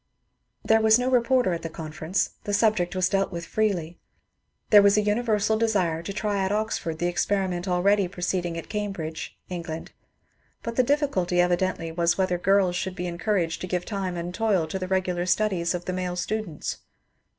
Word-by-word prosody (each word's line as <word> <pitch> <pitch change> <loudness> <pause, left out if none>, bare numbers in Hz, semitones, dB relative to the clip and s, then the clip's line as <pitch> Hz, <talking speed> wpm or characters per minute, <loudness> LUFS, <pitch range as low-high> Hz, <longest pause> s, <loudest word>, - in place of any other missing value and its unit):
There 220 0 +4
was 220 0 +6
no 250 +1 0
reporter 250 -4 +3
at 170 - -3
the 165 - -5
conference; 160 +3 -2
the 205 - 0
subject 200 -5 +2
was 185 -1 +2
dealt 195 0 0
with 170 -2 -5
freely. 175 -5 -1 0.7
There 205 -2 +9
was 200 +1 +5
a - - +5
universal 215 0 +1
desire 185 -8 +1
to 170 - -5
try 205 -1 -1
at 190 - 0
Oxford 210 -6 -1
the 175 - -2
experiment 185 0 0
already 190 +2 +3
proceeding 175 -2 -2
at 165 - -6
Cambridge 195 -7 -4
(England), 170 -3 -6 0.7
but 230 0 -4
the 255 - +5
difficulty 250 - +1
evidently 175 -1 +1
was 170 +1 +1
whether 185 -2 +1
girls 195 -1 +3
should 185 +1 -3
be 180 -1 -4
encouraged 175 -1 -1
to 185 - -4
give 180 -1 -2
time 190 -4 -3
and 175 +1 -4
toil 200 -5 +1
to 190 - -3
the 185 - -3
regular 185 -1 0
studies 185 -3 +1
of 175 - -5
the 185 - -2
male 180 -1 -2
students. 180 -3 -3
185 Hz, 180 wpm, -25 LUFS, 175-210 Hz, 0.7 s, There